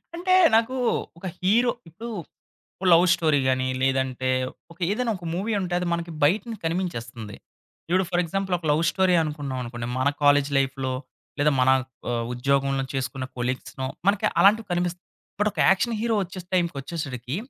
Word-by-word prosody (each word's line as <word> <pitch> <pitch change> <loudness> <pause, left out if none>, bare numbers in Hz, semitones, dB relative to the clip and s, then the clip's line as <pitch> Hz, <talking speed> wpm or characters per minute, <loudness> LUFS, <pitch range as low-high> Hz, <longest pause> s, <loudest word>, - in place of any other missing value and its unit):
అంటే 370 +2 +1 0.2
నాకు 230 +3 +2 0.4
ఒక 180 - -10 0.2
హీరో 230 +6 +3 0.2
ఇప్పుడు 225 +9 -8 0.7
ఓ - - -3
లవ్ 170 +2 +6
స్టోరీ 155 -5 +2
గానీ, 130 0 +1
లేదంటే 130 -1 0 0.4
ఒక 170 - -16
ఏదైనా 235 +2 0
ఒక 175 - -11
మూవీ 210 +5 -1
ఉంటే 180 -1 -3
అది 180 - -2
మనకి 170 0 -3
బయట 180 +9 +4
నించి 220 -3 -6
కనిపించేస్తుంది. 120 - -4 0.5
ఇప్పుడు 185 +2 +3
ఫర్ 175 -1 +2
ఎగ్జాంపుల్ 190 +2 -1
ఒక 165 - -10
లవ్ 150 +2 +2
స్టోరీ 185 -2 +2
అనుకున్నాం 145 -4 -4
అనుకోండి, 120 0 -6
మన 130 +2 +3
కాలేజీ 145 0 +4
లైఫ్‌లో 135 -1 0 0.5
లేదా 150 +1 +4
మన 125 - +4 0.4
ఆహ్, 115 -1 -1
ఉద్యోగంలో 135 +1 +1
చేసుకున్న 135 0 -3
కొలీగ్స్‌నో 130 +1 -3 0.2
మనకి 200 0 +3
అలాంటివి 215 +2 +5
కనిపిస్తాయి. 175 +1 -2 0.4
బట్ 210 +1 +3
ఒక - - -8
యాక్షన్ 220 +4 +2
హీరో 230 -1 +1
వచ్చేస్ 180 0 -9
టైంకొచ్చేసరికి 145 -6 -2
165 Hz, 160 wpm, -25 LUFS, 135-190 Hz, 0.7 s, లవ్